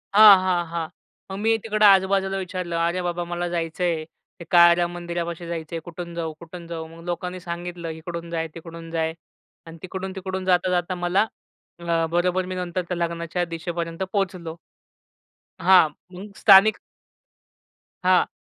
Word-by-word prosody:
हां, 210 -2 +10
हां, 180 -2 +1
हां. 165 -1 -3 0.4
मग 190 - -4
मी 225 +1 +3
तिकडं 215 -1 +2
आजूबाजूला 195 0 +4
विचारलं 180 -2 -4
"अरे 170 +2 0
बाबा! 175 0 -2
मला 175 0 -3
जायचं 170 +1 -3
आहे. 165 -3 0 0.3
ते - - -7
काळाराम 175 0 +6
मंदिरापाशी 170 -1 -5
जायचं 165 -1 -5
आहे. - - -2
कुठून 175 0 -7
जाऊ, 165 -2 -3
कुठून 170 +1 -10
जाऊ?" 165 -1 -6
मग 165 - -13
लोकांनी 180 +1 -4
सांगितलं 175 -1 -6
"इकडून 170 +1 -7
जा, 165 -1 -2
तिकडून 165 0 -9
जा" 160 -1 -1 0.5
आणि 165 0 -11
तिकडून-तिकडून 190 0 -5
जाता-जाता 180 0 +1
मला 175 +4 +1 0.5
अ, 170 -1 0
बरोबर 180 +2 +1
मी 185 0 -5
नंतर 180 0 -2
त्या 180 - -2
लग्नाच्या 170 +1 -2
दिशेपर्यंत 165 +1 -4
पोहोचलो. 180 -5 -2 1.0
हां, 180 -2 +6 0.2
मग 200 +3 -10
स्थानिक 200 +1 +7 1.2
हां. 185 0 +4
175 Hz, 145 wpm, -24 LUFS, 170-185 Hz, 1.2 s, हां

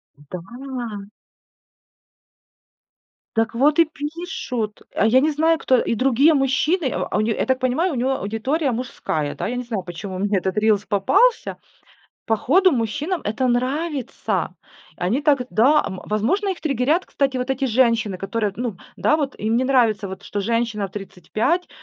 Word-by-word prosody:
Да. 210 - -7 2.3
Так 225 +2 +1
вот 290 +6 +3
и 335 - +7
пишут, 295 - -5
а - - +2
я 235 +4 +5
не 305 +4 +2
знаю 320 +2 +2
кто, 260 - +3
и 230 - 0
другие 270 +6 +4
мужчины, 275 +3 +1
а, - - -2
а, - - +1
у - - +2
не, 220 +1 0
я - - 0
так 260 -1 +1
понимаю, 260 +8 +1
у - - -3
него 255 +2 0
аудитория 260 +9 -1
мужская, 160 - -3
да, - - -3
я 245 - -3
не 250 - -3
знаю, 225 -6 -4
почему 185 +2 -7
мне 200 +1 +1
этот 190 +2 -2
рилс 210 -1 +2
попался. 450 - +2 0.7
Походу 315 - +4
мужчинам 290 - -1
это 220 +5 -1
нравится. 265 +3 -1 0.4
Они 205 +11 0
так, 285 -3 +3
да, 255 - +4
м 190 - -5
возможно 275 - 0
их 375 - -4
триггерят, 295 +4 +1
кстати, 270 -2 0
вот 250 +1 -2
эти 265 0 0
женщины, 230 -5 +2
которые, 210 +1 -2
ну 235 -5 -3 0.2
да, 305 - +3
вот 285 -4 -3
им 220 +2 0
не 250 - +2
нравится 235 -6 +2
вот, 190 +1 -8
что 205 - -3
женщина 225 -1 -1
в - - -24
35 210 - -2
245 Hz, 165 wpm, -22 LUFS, 210-285 Hz, 2.3 s, и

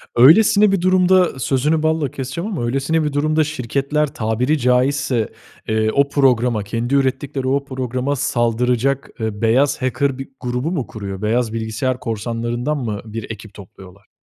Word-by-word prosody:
Öylesine 200 - +6
bir 195 -3 +1
durumda 185 -4 +3
Sözünü 150 +5 +1
balla 155 -4 0
keseceğim 135 +10 -5
ama 160 - -2
öylesine 135 +6 0
bir 150 -1 -2
durumda 155 +2 +2
şirketler 145 +1 -1
tabiri 120 +7 0
caizse, 125 -2 +1 0.4
eee, 110 0 +1
o 140 0 +2
programa, 125 -6 +2
kendi 115 +6 -2
ürettikleri 135 0 -1
o 140 +1 +1
programa 130 +1 -2
saldıracak, 125 +1 0
eee, 110 -1 -3
beyaz 125 +5 +2
hacker 130 +1 0
bir 135 - -7
grubu 125 +6 -2
mu 145 -9 -2
kuruyor? 100 -2 -7
Beyaz 115 +1 0
bilgisayar 115 +3 -2
korsanlarından 120 +5 -3
mı, 110 -6 -3
bir 110 0 -6
ekip 110 -1 -10
topluyorlar? 95 0 -14
130 Hz, 150 wpm, -19 LUFS, 115-145 Hz, 0.4 s, Öylesine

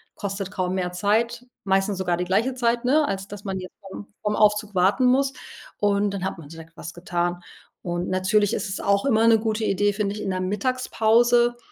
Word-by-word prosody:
kostet 195 -1 -4
kaum 185 -2 -2
mehr 180 -1 -2
Zeit, 215 +6 0 0.2
meistens 195 0 +1
sogar 180 -2 0
die 180 - -2
gleiche 220 +8 +1
Zeit, 240 -1 0
ne? 295 +3 +3
Als 195 0 -3
dass 205 -1 -9
man 190 -1 -3
jetzt 185 0 -9
vorm 195 +1 -10
vorm 210 0 -1
Aufzug 210 -1 +2
warten 195 +8 +3
muss. 270 +2 +2 0.4
Und 205 0 +1
dann 195 -2 -4
hat 190 - -3
man 150 -3 -12
direkt 165 0 -13
was 170 - -8
getan. 175 0 -2 0.4
Und 175 0 -3
natürlich 185 +2 +2
ist - - -2
es 190 - -4
auch 200 +2 +1
immer 225 -4 +3
'ne 225 -1 +6
gute 220 0 -2
Idee, 205 +1 +2
finde 200 -1 -1
ich, 210 - -6
in - - -3
der 185 -1 -1
Mittagspause, 240 +3 +2
200 Hz, 205 wpm, -24 LUFS, 185-225 Hz, 0.4 s, ne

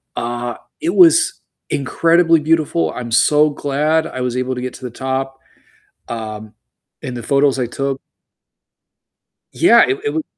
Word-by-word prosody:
Uh, 120 0 -4 0.3
it 335 +2 -1
was 335 -2 +5 0.3
incredibly 165 +4 +2
beautiful. 150 - 0
I'm 120 -2 -6
so 150 +5 +4
glad 150 +3 0
I 130 - -6
was 125 -1 -2
able 130 0 -2
to 125 - -5
get 130 -1 -5
to 130 - -10
the - - -4
top, 135 +2 -4 0.7
um, 110 -2 -7 0.5
and 125 -1 -5
the 115 - -7
photos 140 0 +2
I 125 - 0
took 135 +2 -3 1.5
Yeah. - - +5
It 395 +1 -1
it 435 - -1
was 320 - -2
135 Hz, 150 wpm, -18 LUFS, 120-155 Hz, 1.5 s, was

